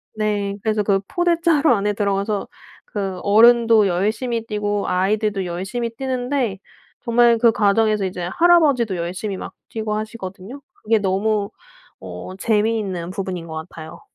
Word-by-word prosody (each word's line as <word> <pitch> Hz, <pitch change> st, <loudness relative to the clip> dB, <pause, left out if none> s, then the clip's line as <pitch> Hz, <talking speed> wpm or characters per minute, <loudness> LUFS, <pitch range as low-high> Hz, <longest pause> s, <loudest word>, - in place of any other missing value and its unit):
네. 205 Hz, -2 st, -1 dB
그래서 215 Hz, -1 st, 0 dB
그 195 Hz, -1 st, +2 dB
포대 350 Hz, -1 st, +1 dB
자루 315 Hz, -5 st, +4 dB
안에 205 Hz, -1 st, 0 dB
들어가서 200 Hz, 0 st, -1 dB, 0.4 s
그 195 Hz, -3 st, -4 dB
어른도 225 Hz, 0 st, +5 dB
열심히 220 Hz, +6 st, -1 dB
뛰고 205 Hz, -2 st, -2 dB
아이들도 200 Hz, +1 st, 0 dB
열심히 195 Hz, +7 st, -3 dB
뛰는데 250 Hz, -3 st, -2 dB, 0.4 s
정말 235 Hz, 0 st, +4 dB
그 230 Hz, 0 st, +4 dB
과정에서 210 Hz, -1 st, +2 dB
이제 180 Hz, -1 st, -4 dB
할아버지도 295 Hz, -, +4 dB
열심히 185 Hz, +4 st, -4 dB
막 -, -, -8 dB, 0.2 s
뛰고 220 Hz, -1 st, -3 dB
하시거든요. 215 Hz, +3 st, -7 dB
그게 225 Hz, +1 st, 0 dB
너무 200 Hz, +1 st, 0 dB, 0.5 s
어 90 Hz, -, -8 dB
재미있는 210 Hz, -5 st, 0 dB
부분인 185 Hz, -3 st, -5 dB
것 160 Hz, -, -8 dB, 0.2 s
같아요. 160 Hz, -1 st, -11 dB
210 Hz, 320 characters per minute, -21 LUFS, 195-230 Hz, 0.5 s, 어른도